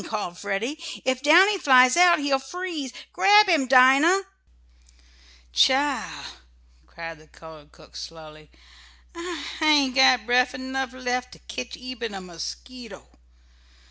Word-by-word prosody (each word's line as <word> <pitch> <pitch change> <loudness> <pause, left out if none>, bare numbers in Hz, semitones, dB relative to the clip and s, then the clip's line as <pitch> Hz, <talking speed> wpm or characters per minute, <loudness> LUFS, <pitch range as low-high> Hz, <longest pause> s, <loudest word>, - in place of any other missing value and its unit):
called 205 -5 -5
Freddie. 205 - -4 0.3
"If 260 0 -1
Downy 370 +7 +4
flies 255 -3 +5
out 350 0 +5
he'll 285 -2 -1
freeze. 310 -1 -7 0.2
Grab 415 +1 +5
him, 315 -8 +1
Dinah!" 270 +9 +5 1.3
"Chile!" 275 - +2 0.8
cried 165 - -10
the 155 - -21
colored 155 -2 -16
cook - - -20
slowly, 155 -2 -12 0.6
"I 345 0 -7 0.2
ain't 290 -4 +3
got 260 -4 +4
bref 250 +1 +1
enough 260 0 -5
lef 250 0 -4
to - - -16
ketch 250 - -7
eben 245 -4 -7
a - - -6
mosquito. 195 +5 -10
255 Hz, 120 wpm, -23 LUFS, 225-295 Hz, 1.3 s, flies